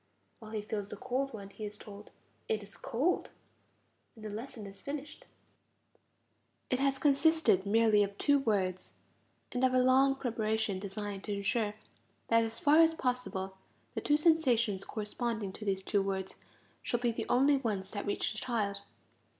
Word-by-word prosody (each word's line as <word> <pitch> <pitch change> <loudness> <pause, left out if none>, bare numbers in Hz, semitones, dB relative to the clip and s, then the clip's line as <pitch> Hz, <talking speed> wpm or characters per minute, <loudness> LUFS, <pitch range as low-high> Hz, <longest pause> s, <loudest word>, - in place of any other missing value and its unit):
While 220 - -11
he 215 -1 -2
feels 205 -1 -3
the 210 - -7
cold 265 +6 -2
one 200 -3 -8
he 215 - -9
is 210 0 -5
told: 205 0 -11 0.4
It 215 -1 0
is 200 - -12
cold. 285 +10 0 0.9
And 220 -1 -11
the 215 - -4
lesson 220 0 -7
is 195 0 -11
finished. 290 +1 -6 1.5
It 255 - +2
has 275 0 +2
consisted 290 - +3
merely 220 0 +4
of 200 0 -1
two 285 -1 +4
words, 190 -7 -1 0.6
and 250 0 -1
of 255 0 +4
a - - +5
long 265 +2 +5
preparation 220 -5 -1
designed 200 0 -5
to 205 - -2
ensure 205 +1 0 0.5
that 230 0 +5
as 225 0 -4
far 295 +5 +5
as 325 0 +6
possible, 220 -9 -2 0.3
the - - -3
two 295 - +3
sensations 245 - +3
corresponding 215 -1 -3
to 215 - -8
these 190 -1 0
two 200 +1 +1
words 190 -1 -3 0.5
shall 240 - -1
be 240 -1 +1
the 225 0 -4
only 275 +3 +5
ones 205 -7 -2
that 205 -1 -4
reach 205 - 0
the 215 - -5
child. 210 -5 -1
220 Hz, 165 wpm, -32 LUFS, 200-255 Hz, 1.5 s, as